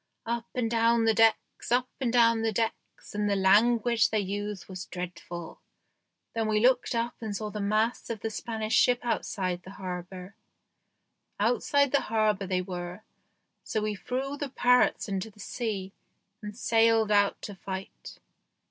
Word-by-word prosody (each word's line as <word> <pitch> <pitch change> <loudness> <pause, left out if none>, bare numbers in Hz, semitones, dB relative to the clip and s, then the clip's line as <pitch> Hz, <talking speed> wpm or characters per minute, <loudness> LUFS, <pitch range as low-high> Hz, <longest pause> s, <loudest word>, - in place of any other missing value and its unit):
Up 235 0 -2
and 245 -2 0
down 230 0 +3
the 225 - +4
decks, 225 +1 +2
up 250 +1 +3
and 255 -4 0
down 230 -2 +4
the 225 0 +1
decks, 225 +1 -4
and 210 0 0
the 200 - +2
language 225 +4 +4
they 215 - +1
used 205 0 -4
was 185 -1 -7
dreadful. 175 -1 -7 0.7
Then 225 -1 -1
we 215 -1 +2
looked 250 +1 +3
up 235 +1 -1
and 215 -3 -4
saw 210 0 -4
the 210 - -5
masts 215 +4 0
of 225 -3 -4
the 225 - -3
Spanish 220 0 -4
ship 245 -1 +4
outside 185 -6 -2
the 185 - -12
harbour. 180 +1 -6 1.1
Outside 255 +5 +2
the 280 - +3
harbour 215 -3 0
they 185 -1 0
were, 180 +1 -6 0.6
so 220 - -2
we 215 0 -1
threw 265 +7 -4
the 285 -1 -4
parrots 250 -2 +3
into 195 +1 -3
the 210 - -21
sea 200 -3 -4 0.5
and 210 0 -8
sailed 225 -2 +3
out 205 -1 +3
to 205 - -6
fight. 190 0 -8
215 Hz, 160 wpm, -28 LUFS, 195-235 Hz, 1.1 s, the